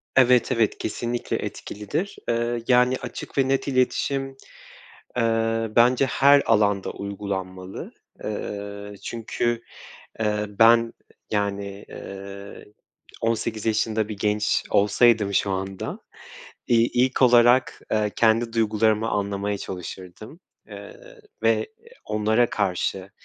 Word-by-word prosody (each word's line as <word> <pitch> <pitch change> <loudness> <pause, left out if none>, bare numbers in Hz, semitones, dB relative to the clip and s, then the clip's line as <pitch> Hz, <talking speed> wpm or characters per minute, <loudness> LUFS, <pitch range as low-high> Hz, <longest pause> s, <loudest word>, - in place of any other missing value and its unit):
Evet, 125 -1 +5
evet. 115 -4 +1
Kesinlikle 120 +2 -3
etkilidir. 145 - -5
Eee, 120 0 0
yani, 125 0 +4
açık 125 - -8
ve 135 -1 +3
net 135 +1 0
iletişim, 135 +1 0 0.8
eee, 115 -1 +1
bence 125 +3 +5
her 140 +2 +5
alanda 105 -3 +2
uygulanmalı. 95 -2 -6 0.3
Eee, 100 -1 -5
çünkü, 115 0 -2 0.6
eee, 105 -1 0
ben, 115 0 +6 0.4
yani, 100 -1 -2
eee, 100 0 -9 0.6
18 115 -1 -1
yaşında 110 -1 0
bir 105 - -5
genç 105 +1 +1
olsaydım 105 0 +3
şu 100 0 +1
anda, 95 0 -4 0.7
iii, 115 0 +3
ilk 130 +2 +1
olarak, 120 0 +5
eee, 105 -1 +1
kendi 115 +1 +2
duygularımı 110 -1 +2
anlamaya 100 0 -2
çalışırdım. 95 - -8 0.3
Eee, - - -12 0.2
ve - - +2 0.4
onlara 110 +3 +1
karşı, 95 -1 -2
110 Hz, 105 wpm, -24 LUFS, 100-120 Hz, 0.8 s, ben